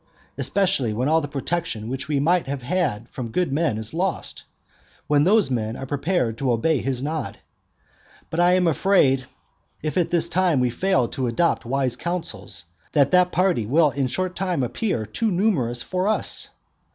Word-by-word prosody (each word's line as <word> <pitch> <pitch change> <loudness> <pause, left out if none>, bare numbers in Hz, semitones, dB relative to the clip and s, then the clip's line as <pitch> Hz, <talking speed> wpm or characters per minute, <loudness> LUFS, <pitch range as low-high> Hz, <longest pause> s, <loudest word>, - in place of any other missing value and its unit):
especially 145 - +1
when 125 +5 -1
all 160 +2 +3
the 145 - -4
protection 140 -5 -3
which 135 +3 -4
we 150 -2 0
might 170 +2 +2
have 135 -2 -4
had 130 - -1
from 120 -4 -6
good 180 +3 0
men 150 -7 +1
is 110 +3 -6
lost, 180 +2 -2
and - - -28
when 145 -1 +3
those 205 -5 +4
men 110 -2 -1
are 135 - -6
prepared 140 -4 -1
to 135 -2 +1
obey 135 +6 +2
his 130 0 -2
nod? 155 +2 -3 0.9
But 160 - -2
I 175 +1 +5
am 185 -1 +3
afraid, 150 -6 +3 0.6
if 155 +3 -2
at 175 - +1
this 170 -1 +1
time 175 -4 +2
we 125 -1 +1
fail 130 -4 +1
to 130 -2 -2
adopt 125 +4 +1
wise 130 0 0
counsels, 175 +4 -5 0.3
that 140 -2 +3
that 180 0 +4
party 175 - +1
will 150 +4 +4
in 135 -1 -1
a - - -7
short 185 +7 -2
time 180 -7 -1
appear 125 - -2
too 220 - -1
numerous 170 - 0
for 185 +1 -1
us. 215 - 0
150 Hz, 185 wpm, -23 LUFS, 125-180 Hz, 0.9 s, I